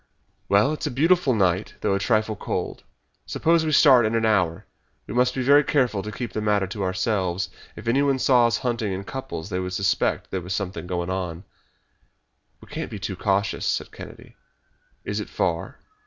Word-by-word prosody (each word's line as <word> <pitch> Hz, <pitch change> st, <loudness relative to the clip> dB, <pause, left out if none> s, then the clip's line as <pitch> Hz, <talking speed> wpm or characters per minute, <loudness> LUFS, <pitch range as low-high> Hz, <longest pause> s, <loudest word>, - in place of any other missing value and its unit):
"Well, 105 Hz, +9 st, +4 dB
it 155 Hz, -, -5 dB
is 155 Hz, -, -1 dB
a -, -, -1 dB
beautiful 150 Hz, 0 st, +3 dB
night 95 Hz, -1 st, +1 dB
though 105 Hz, -, +1 dB
a 100 Hz, -, +1 dB
trifle 110 Hz, 0 st, +1 dB
cold. -, -, -4 dB, 0.5 s
Suppose 165 Hz, 0 st, +2 dB
we 155 Hz, -, -1 dB
start 135 Hz, -5 st, +7 dB
in 110 Hz, +1 st, 0 dB
an 115 Hz, 0 st, +1 dB
hour. 90 Hz, -7 st, +1 dB, 0.4 s
We -, -, -7 dB
must 125 Hz, +1 st, +2 dB
be 130 Hz, -, -1 dB
very 145 Hz, +3 st, +6 dB
careful 125 Hz, -9 st, +1 dB
to 105 Hz, -, -6 dB
keep 120 Hz, +2 st, -5 dB
the 110 Hz, -, -2 dB
matter 105 Hz, -2 st, +2 dB
to 100 Hz, +2 st, -6 dB
ourselves. 95 Hz, -1 st, -1 dB, 0.3 s
If -, -, -10 dB
anyone 135 Hz, +3 st, +2 dB
saw 125 Hz, -2 st, +4 dB
us 115 Hz, -, 0 dB
hunting 115 Hz, -5 st, -2 dB
in 95 Hz, +1 st, -4 dB
couples 105 Hz, -7 st, -6 dB
they 90 Hz, -, -1 dB
would 90 Hz, 0 st, -4 dB
suspect 95 Hz, +1 st, +1 dB
that -, -, -32 dB
there 95 Hz, -, -2 dB
was 90 Hz, +2 st, -3 dB
something 95 Hz, -2 st, -4 dB
going 90 Hz, 0 st, -2 dB
on." 90 Hz, -2 st, -4 dB, 1.2 s
"We -, -, -15 dB
can't -, -, -5 dB
be -, -, -6 dB
too 95 Hz, 0 st, -4 dB
cautious," 100 Hz, +2 st, 0 dB
said -, -, -1 dB
Kennedy. -, -, -12 dB, 0.7 s
"Is -, -, -2 dB
it -, -, -5 dB
far?" -, -, -2 dB
105 Hz, 200 wpm, -24 LUFS, 95-125 Hz, 1.2 s, start